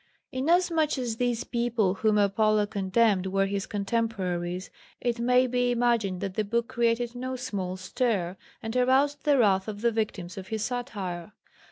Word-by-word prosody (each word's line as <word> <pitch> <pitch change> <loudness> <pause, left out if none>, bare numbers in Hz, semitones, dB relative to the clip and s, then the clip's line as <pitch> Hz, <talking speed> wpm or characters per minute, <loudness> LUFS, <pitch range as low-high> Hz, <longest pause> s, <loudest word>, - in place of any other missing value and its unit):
Inasmuch 320 +2 +2
as 240 -3 -2
these 245 -1 0
people 235 -5 0
whom 210 +2 +2
Apollo 210 +1 +3
condemned 200 0 +1
were 195 +1 +1
his 195 0 -3
contemporaries, 195 -5 -2 0.3
it 240 -1 -1
may 250 +2 +4
be 245 0 +1
imagined 235 -6 +1
that 195 -2 -3
the 215 - 0
book 230 +3 -1
created 235 -1 0
no 255 +1 -4
small 200 -8 -4
stir, 185 -2 -1 0.3
and 225 +2 -4
aroused 270 +3 +2
the 290 -2 +4
wrath 195 -5 +3
of 210 -1 -5
the 235 0 +3
victims 200 -5 -3
of 190 - -9
his 220 -1 -2
satire. 205 -7 -4
225 Hz, 160 wpm, -27 LUFS, 195-245 Hz, 0.3 s, may